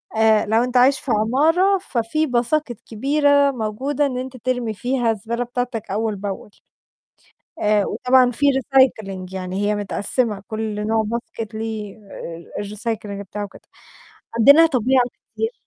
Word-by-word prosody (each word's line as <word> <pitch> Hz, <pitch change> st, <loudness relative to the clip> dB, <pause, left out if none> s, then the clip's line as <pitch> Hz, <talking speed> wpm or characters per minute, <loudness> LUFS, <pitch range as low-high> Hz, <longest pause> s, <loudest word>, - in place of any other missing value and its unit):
آآ 220 Hz, -1 st, +4 dB
لو 225 Hz, +3 st, +2 dB
أنت 250 Hz, 0 st, 0 dB
عايش 265 Hz, +3 st, +5 dB
في 260 Hz, -, -4 dB
عمارة، 310 Hz, -, +3 dB
ففي 300 Hz, -, -1 dB
باساكِت 245 Hz, -1 st, -1 dB
كبيرة 285 Hz, +4 st, +2 dB
موجودة 260 Hz, +5 st, -1 dB
إن 260 Hz, -3 st, -2 dB
أنت 255 Hz, 0 st, -6 dB
ترمي 245 Hz, -2 st, -2 dB
فيها 245 Hz, +1 st, 0 dB
الزبالة 230 Hz, +3 st, -3 dB
بتاعتك 245 Hz, -3 st, -4 dB
أول 215 Hz, +1 st, -1 dB
بأول. 200 Hz, 0 st, -6 dB, 1.1 s
آآ 210 Hz, -1 st, +3 dB
وطبعًا 255 Hz, -1 st, +3 dB
فيه 285 Hz, +4 st, +1 dB
recycling، 215 Hz, -9 st, +1 dB
يعني 190 Hz, +2 st, -3 dB
هي 210 Hz, -, +1 dB
متقسِّمة 205 Hz, +1 st, -1 dB
كل 215 Hz, -1 st, -3 dB
نوع 220 Hz, 0 st, +2 dB
باسكيت 230 Hz, -1 st, -5 dB
ليه 220 Hz, -2 st, -5 dB
آآ 170 Hz, -3 st, -8 dB
الrecycling 210 Hz, -1 st, -4 dB
بتاعه 205 Hz, +2 st, -6 dB
وكده. 200 Hz, -, -10 dB, 0.8 s
عندنا 285 Hz, +8 st, +8 dB
طبيعة 260 Hz, -3 st, +2 dB, 0.3 s
كتير. 450 Hz, +2 st, -2 dB
230 Hz, 140 wpm, -21 LUFS, 210-260 Hz, 1.1 s, عندنا